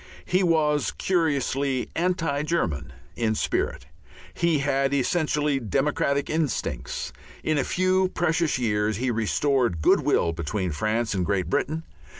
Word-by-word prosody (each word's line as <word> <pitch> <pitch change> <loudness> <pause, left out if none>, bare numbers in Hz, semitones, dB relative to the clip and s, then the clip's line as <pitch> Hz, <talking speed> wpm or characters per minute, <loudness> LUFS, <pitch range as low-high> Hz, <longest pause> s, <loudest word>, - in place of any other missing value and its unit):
He 185 +1 +2
was 155 -4 +2
curiously 140 -6 0
anti 165 -5 0
German 90 - -1 0.2
in 110 -2 0
spirit; - - -1 0.5
he 170 -2 +2
had 135 0 +1
essentially 150 0 +1
democratic 140 +3 0
instincts; 155 -5 -2 0.3
in 155 -2 +1
a - - +2
few 185 +3 +2
precious 170 -3 +1
years 105 -3 0
he 125 +1 0
restored 120 - +1
good - - +5
will 85 - +1
between 90 +3 -2
France 110 +9 -1
and 95 -2 0
Great 95 0 -1
Britain. 160 +3 0
140 Hz, 130 wpm, -25 LUFS, 110-160 Hz, 0.5 s, good